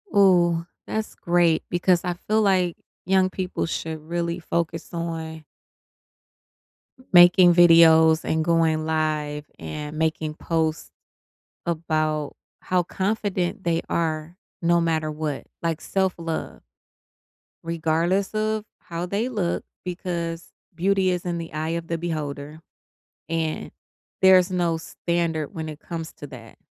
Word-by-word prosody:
Ooh, 175 Hz, -4 st, +4 dB, 0.2 s
that's 220 Hz, 0 st, -4 dB
great 170 Hz, -2 st, +2 dB
because 175 Hz, 0 st, +2 dB
I 180 Hz, -, -1 dB
feel 215 Hz, +1 st, +3 dB
like, 185 Hz, -4 st, +2 dB, 0.3 s
young 190 Hz, -1 st, +4 dB
people 185 Hz, -1 st, -3 dB
should 160 Hz, -1 st, -3 dB
really 170 Hz, +2 st, -2 dB
focus 165 Hz, -1 st, -3 dB
on 165 Hz, -1 st, -4 dB, 1.7 s
making 175 Hz, 0 st, +8 dB
videos 165 Hz, -2 st, +7 dB
and 160 Hz, 0 st, +1 dB
going 160 Hz, -1 st, +2 dB
live 155 Hz, -2 st, -1 dB
and 150 Hz, -, -6 dB
making 160 Hz, -1 st, -1 dB
posts 160 Hz, 0 st, -2 dB, 0.7 s
about 155 Hz, -3 st, -1 dB, 0.2 s
how 180 Hz, -1 st, +1 dB
confident 195 Hz, 0 st, -2 dB
they 170 Hz, -1 st, +1 dB
are 160 Hz, 0 st, -2 dB, 0.2 s
no 170 Hz, 0 st, +3 dB
matter 160 Hz, -2 st, 0 dB
what, 150 Hz, -2 st, -4 dB, 0.2 s
like 165 Hz, -1 st, -1 dB
self-love. 175 Hz, -4 st, -2 dB, 1.0 s
Regardless 170 Hz, +4 st, 0 dB
of 215 Hz, 0 st, 0 dB, 0.2 s
how 170 Hz, +1 st, -5 dB
they 205 Hz, +7 st, -1 dB
look 200 Hz, -8 st, -1 dB, 0.2 s
because 170 Hz, -2 st, -4 dB, 0.3 s
beauty 190 Hz, +2 st, +2 dB
is 180 Hz, -1 st, -2 dB
in 175 Hz, -1 st, -2 dB
the 165 Hz, -1 st, -6 dB
eye 155 Hz, +1 st, -2 dB
of 165 Hz, 0 st, -3 dB
the 165 Hz, -, -1 dB
beholder, 150 Hz, -2 st, -4 dB, 0.7 s
and 160 Hz, -1 st, -2 dB, 0.5 s
there's 190 Hz, -1 st, +6 dB
no 175 Hz, -3 st, 0 dB
standard 165 Hz, -2 st, -2 dB
when 160 Hz, -1 st, -5 dB
it 155 Hz, -1 st, -8 dB
comes 165 Hz, -1 st, -6 dB
to 145 Hz, -, -10 dB
that. 120 Hz, -5 st, -12 dB
170 Hz, 120 wpm, -24 LUFS, 160-180 Hz, 1.7 s, making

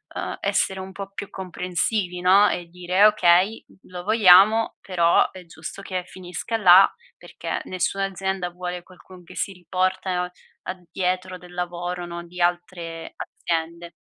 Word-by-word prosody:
uhm, -, -, -4 dB
essere 190 Hz, 0 st, 0 dB
un 190 Hz, 0 st, -8 dB
po' 195 Hz, 0 st, -7 dB
più 200 Hz, 0 st, -6 dB
comprensivi, 180 Hz, +1 st, -2 dB
no, 195 Hz, +3 st, +6 dB
e 175 Hz, -, -3 dB
dire: 180 Hz, +3 st, +2 dB
"Okay, 195 Hz, +1 st, +4 dB, 0.2 s
lo 180 Hz, -1 st, -9 dB
vogliamo, 215 Hz, +1 st, +6 dB
però 170 Hz, -3 st, +3 dB
è 185 Hz, -1 st, -12 dB
giusto 170 Hz, +3 st, -9 dB
che 185 Hz, -2 st, -4 dB
finisca 185 Hz, +5 st, -5 dB
là", 190 Hz, -2 st, +8 dB, 0.3 s
perché -, -, -5 dB
nessuna 185 Hz, +2 st, -1 dB
azienda 190 Hz, -1 st, -3 dB
vuole 180 Hz, 0 st, -6 dB
qualcun 185 Hz, 0 st, -16 dB
che 170 Hz, -, -14 dB
si 195 Hz, -, -2 dB
riportano 185 Hz, 0 st, -1 dB, 0.3 s
a 185 Hz, -, -5 dB
dietro 185 Hz, 0 st, -2 dB
del 180 Hz, 0 st, -15 dB
lavoro, 175 Hz, 0 st, -4 dB
no, 170 Hz, 0 st, -7 dB
di 180 Hz, +1 st, -8 dB
altre 175 Hz, -1 st, -2 dB
aziende. 170 Hz, +1 st, -4 dB
180 Hz, 145 wpm, -23 LUFS, 175-190 Hz, 0.3 s, là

